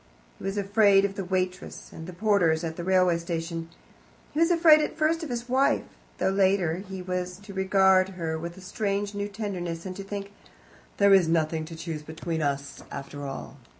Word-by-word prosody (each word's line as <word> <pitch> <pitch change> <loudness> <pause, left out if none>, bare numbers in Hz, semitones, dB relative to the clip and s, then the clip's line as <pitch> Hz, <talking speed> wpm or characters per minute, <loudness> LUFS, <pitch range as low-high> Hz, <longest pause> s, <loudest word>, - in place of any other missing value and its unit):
He - - -11
was 195 +1 -2
afraid 200 0 +4
of 200 - -2
the 195 - -4
waitress 185 0 -3
and 160 0 -8
the - - -6
porters 180 -5 +2
at 160 -1 -3
the 170 - -5
railway 185 -2 +3
station. 165 -1 -4 0.6
He 300 - -3
was 330 +1 +4
afraid 330 -3 +6
at 300 - -3
first 320 +1 +2
of 320 - -5
his 240 0 -4
wife, 265 +2 +2 0.3
though 190 - +1
later 190 -4 +2
he 190 -1 -7
was 180 0 -3
to 200 0 -11
regard 190 0 +4
her 160 -2 -2
with 170 +2 -6
a - - -11
strange 200 +1 -2
new 205 0 -2
tenderness, 185 -5 -4
and 185 -1 -5
to 195 - -6
think, 200 0 -6 0.7
"There 200 0 +6
is 190 -4 +6
nothing 160 -1 +1
to 165 +1 -9
choose 160 -2 -5
between 160 +1 -4
us, 140 -1 -2
after 140 +1 -6
all." 135 - -7
185 Hz, 195 wpm, -27 LUFS, 165-200 Hz, 0.7 s, afraid